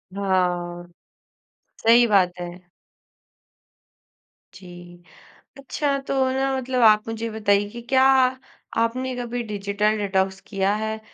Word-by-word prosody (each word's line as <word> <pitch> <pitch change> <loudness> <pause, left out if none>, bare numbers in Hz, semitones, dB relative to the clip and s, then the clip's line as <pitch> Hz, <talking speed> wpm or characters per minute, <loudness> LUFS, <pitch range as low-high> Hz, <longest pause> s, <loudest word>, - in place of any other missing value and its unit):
हाँ, 180 -3 -1 1.0
सही 235 +2 +6
बात 190 -5 +3
है। 175 0 -9 1.9
जी। 175 -1 -13 0.5
अच्छा 280 +1 -2
तो - - -1 0.2
ना 270 +1 0
मतलब 255 -1 -2
आप 215 -1 +5
मुझे 225 0 -4
ये 230 - -4
बताइए 205 -1 +1
कि 235 +3 -9
क्या 260 -1 +4 0.7
आपने 255 +3 -1
कभी 245 0 -4
डिजिटल 205 +1 -1
डेटॉक्स 190 -2 -1
किया 195 -1 0
है? 220 +1 -3
210 Hz, 115 wpm, -23 LUFS, 190-240 Hz, 1.9 s, सही